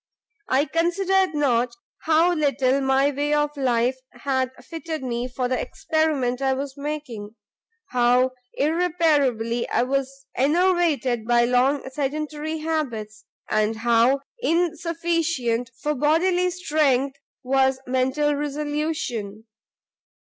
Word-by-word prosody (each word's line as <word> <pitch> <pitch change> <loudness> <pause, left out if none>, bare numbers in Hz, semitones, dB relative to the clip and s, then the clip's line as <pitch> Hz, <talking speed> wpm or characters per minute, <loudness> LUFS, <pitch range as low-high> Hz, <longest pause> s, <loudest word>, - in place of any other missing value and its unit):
I 270 +3 +3
considered 365 +2 +1
not 245 -4 +1 0.3
how 325 +3 +4
little 275 -4 +1
my 270 +1 +3
way 290 +2 0
of 295 0 0
life 255 -1 +1
had 260 -2 -1 0.2
fitted 320 -3 -5
me 240 -1 -2
for 250 0 -2
the 255 0 -1
experiment 310 -9 -1
I 265 -1 +2
was 270 0 -5
making, 280 -8 -6 0.6
how 250 +1 +3 0.2
irreparably 290 -8 +1
I - - +2
was 275 +1 -2
enervated 300 -6 +2
by 240 0 +4
long 255 +3 +2
sedentary 300 +3 -3
habits, 235 -10 -3 0.2
and 215 +1 +1
how 235 +4 +3 0.2
insufficient 335 - 0
for 300 0 -1
bodily 350 +6 +2
strength 285 -6 0 0.2
was 265 0 +2
mental 260 +4 +1
resolution. 290 -7 -3
275 Hz, 105 wpm, -23 LUFS, 250-315 Hz, 0.6 s, how